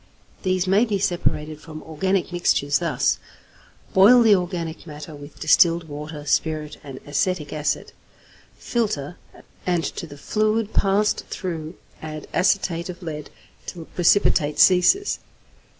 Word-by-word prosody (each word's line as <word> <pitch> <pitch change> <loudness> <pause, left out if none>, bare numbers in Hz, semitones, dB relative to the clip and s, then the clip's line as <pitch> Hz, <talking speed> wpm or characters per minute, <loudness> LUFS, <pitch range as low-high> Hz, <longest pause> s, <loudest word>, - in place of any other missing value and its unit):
These 185 -1 0
may 195 +4 +4
be 215 -4 0
separated 155 -5 -1
from 155 -1 -10
organic 185 +4 -1
mixtures 145 -5 +1
thus: - - 0 0.7
Boil 230 +6 +7
the 220 -2 +6
organic 175 -3 -2
matter 150 +1 -9
with 145 0 -12
distilled 165 +1 +4
water, 150 0 -7
spirit, 155 0 -1
and 135 -3 -9
acetic 150 +2 -1
acid; 150 -1 -2 0.7
filter, 180 - -2 0.5
and 175 -2 +1
to 170 - -5
the 145 -1 -11
fluid 215 +6 0
passed 200 +2 +1
through 165 -2 -5 0.3
add 155 -1 -7
acetate 180 -2 +1
of 180 +1 -8
lead 150 -3 -6 0.4
till 170 -3 -7
precipitate 170 -4 +2
ceases. 195 - +4
170 Hz, 125 wpm, -23 LUFS, 150-190 Hz, 0.7 s, Boil